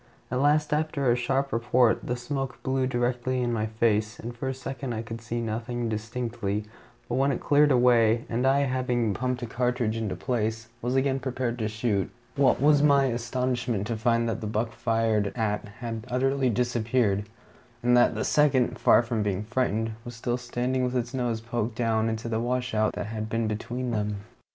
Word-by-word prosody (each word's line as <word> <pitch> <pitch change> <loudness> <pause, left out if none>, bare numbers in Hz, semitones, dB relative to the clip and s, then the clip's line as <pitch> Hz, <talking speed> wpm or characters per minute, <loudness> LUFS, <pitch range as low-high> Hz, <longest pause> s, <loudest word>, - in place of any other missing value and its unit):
At 125 +1 0
last, 150 +1 +3
after 150 -4 +1
a - - +4
sharp 135 +2 0
report, 120 0 +2
the 125 - 0
smoke 135 +1 -4
blew 130 -1 +1
directly 125 0 0
in 120 -1 0
my 110 -1 0
face, 110 -1 0
and 120 +2 -6
for 125 +3 -4
a - - -1
second 130 -1 -5
I 110 - -3
could 115 0 -7
see 115 +1 -3
nothing 115 +1 -3
distinctly; 110 -1 -3 0.4
but - - -4
when 135 +1 +3
it 130 - -2
cleared 145 0 +4
away, 120 -2 +4
and 120 +3 0
I, 135 +1 +4
having 125 -4 0
pumped 125 +4 -2
a - - -1
cartridge 120 -1 0
into 105 -5 -2
place, 110 +2 -2
was 125 +2 -1
again 135 0 +2
prepared 125 -2 -2
to 110 - 0
shoot, 105 -2 -1 0.3
what 135 -3 +3
was 145 +1 +5
my 140 -2 +5
astonishment 120 -3 -1
to 115 +1 -2
find 115 +1 +1
that 115 - -2
the 110 - -3
buck 110 +2 -1
fired 115 -3 +1
at 105 -2 -1
had 115 +1 -6
utterly 135 +1 +1
disappeared, 115 -3 0 0.5
and 125 0 +4
that 120 - +4
the - - -1
second, 140 -4 +2
far - - +5
from 115 -2 -1
being 100 -1 -1
frightened, 115 -1 0
was 120 -1 -8
still 120 +1 -1
standing 125 +1 -1
with 125 0 -1
his 120 0 -2
nose 120 -4 -1
poked 115 -1 -3
down 115 -1 +1
into 110 +1 -3
the 110 -1 -1
washout 120 -3 0
that - - -4
had 110 0 -4
been 115 +1 0
between 120 +4 -3
them. 105 -2 -2
120 Hz, 190 wpm, -27 LUFS, 110-125 Hz, 0.5 s, was